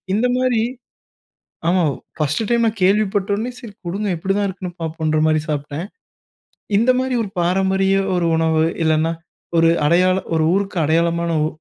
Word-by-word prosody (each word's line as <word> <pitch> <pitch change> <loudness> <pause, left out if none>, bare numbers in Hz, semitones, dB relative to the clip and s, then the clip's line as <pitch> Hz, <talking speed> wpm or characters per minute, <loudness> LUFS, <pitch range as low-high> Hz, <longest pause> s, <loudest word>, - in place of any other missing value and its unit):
இந்த 230 +4 +2
மாரி 255 -3 +1 1.1
ஆமா. 180 0 +3 0.4
பர்ஸ்ட் 155 +7 0
டைம் 235 -1 +3
நான் 220 -1 -3
கேள்விப்பட்ட 200 0 +2
உனே, 235 +4 -3
"சரி 230 -5 -10
குடுங்க" 200 +5 -3
எப்படி 190 +4 -1
தான் 205 -1 +1
இருக்குன்னு 185 -1 -7
பார்ப்போம்ங்கற 155 -1 -1
மாரி 155 -1 +2
சாப்பிட்டேன். 150 +2 -3 0.9
இந்த 235 +4 +4
மாரி 260 0 -1
ஒரு 205 - -6
பாரம்பரிய 190 +2 +2 0.2
ஒரு 175 -1 +1
உணவு, 160 -1 +2 0.2
இல்லன்னா 160 +1 +2 0.5
ஒரு 165 0 +5 0.2
அடையாளம் 185 +3 +2
ஒரு 160 -1 +2
ஊருக்கு 195 -2 -1
அடையாளமான 170 +2 +1
உ - - +1
185 Hz, 150 wpm, -20 LUFS, 160-205 Hz, 1.1 s, ஒரு